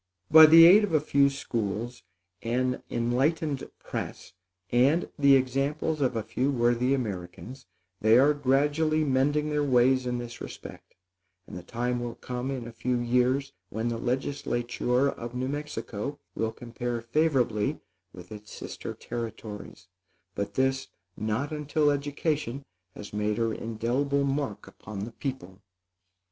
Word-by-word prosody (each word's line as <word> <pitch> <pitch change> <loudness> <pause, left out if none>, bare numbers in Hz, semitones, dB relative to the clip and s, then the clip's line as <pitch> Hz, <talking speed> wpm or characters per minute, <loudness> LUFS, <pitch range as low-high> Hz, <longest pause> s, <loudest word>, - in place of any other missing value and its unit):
By 160 0 +11
the 165 +1 +9
aid 195 +5 +8
of 190 -6 0
a - - +5
few 140 -1 +3
schools, 120 -3 -4 0.4
an 125 +2 -1
enlightened 135 +5 0
press, - - -6 0.4
and 135 +8 +3
the 140 -1 +7
examples 140 +4 0
of 125 -3 +1
a 110 - -1
few 130 +6 -1
worthy 120 0 +2
Americans, 110 +3 -6 0.3
they 110 +2 +5
are 140 +3 +5
gradually 145 +3 +2
mending 145 +2 +1
their 150 0 +1
ways 130 -1 +3
in 125 0 -1
this 120 0 -7
respect; - - -10 0.5
and - - -10
the 90 - -6
time 120 +6 -2
will 120 -1 -5
come 125 +1 -5
in 130 -4 -4
a - - -8
few 125 +2 -1
years, 125 +3 +1 0.2
when 110 +3 -2
the 115 -1 -3
legislature 125 0 -1
of 120 -3 -5
New 130 +1 -2
Mexico 140 -3 -4 0.2
will 110 0 -1
compare 120 +1 -5
favorably 120 -4 +1 0.3
with 90 +2 -13
its 105 0 -10
sister - - -7
territories; 110 -4 -7 0.5
but 100 - -4
this, 135 0 +1 0.3
not 110 +8 -2
until 150 0 +1
education 145 -2 -2 0.3
has 105 - -9
made 105 0 -1
her 115 -1 0
indelible 120 +6 -1
mark 140 -5 -2
upon 100 -1 -8
the 115 - -9
people. 115 -8 -6
125 Hz, 140 wpm, -27 LUFS, 115-140 Hz, 0.5 s, By